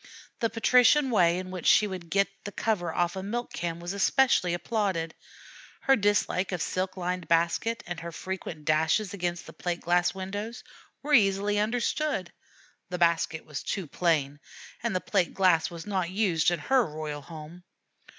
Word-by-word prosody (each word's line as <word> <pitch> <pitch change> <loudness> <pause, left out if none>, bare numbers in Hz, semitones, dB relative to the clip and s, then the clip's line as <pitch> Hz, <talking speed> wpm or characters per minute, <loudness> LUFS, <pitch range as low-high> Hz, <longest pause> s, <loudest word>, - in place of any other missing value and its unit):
The 230 - +1
patrician 250 +5 +4
way 175 -5 +4
in 185 0 -5
which 180 -3 -4
she 215 - +6
would 185 -4 -6
get 195 +3 +3 0.2
the 205 - -6
cover 190 -6 -1
off 175 +2 0
a 190 - -4
milk 235 +5 -4
can 170 0 -3
was 175 +2 -5
especially 200 -2 +3
applauded. 185 -5 -1 0.7
Her 270 - +4
dislike 205 -3 +1
of 180 - -2
her - - 0
silk 185 +1 -3
lined 180 -1 -3
basket, 170 +7 +1
and 175 -1 -5
her 170 +1 -6
frequent 170 -3 -6
dashes 160 +7 +2
against 175 -3 -3
the 160 - -11
plate 175 +2 -3
glass 175 +1 +2
windows, 205 +5 -5 0.4
were 295 +1 -1
easily 205 -3 +3
understood: 235 - -1 0.6
the 180 - -3
basket 170 -2 +1
was 150 -3 -6
too 195 - -3
plain, 145 -3 0 0.4
and 225 -5 0
plate 190 -4 +1
glass 165 -4 +3
was 170 -1 -8
not 190 -4 -1
used 185 -5 +2
in 175 - 0
her 255 - +2
royal 150 -3 -5
home. 160 +3 -11
180 Hz, 170 wpm, -28 LUFS, 170-205 Hz, 0.7 s, she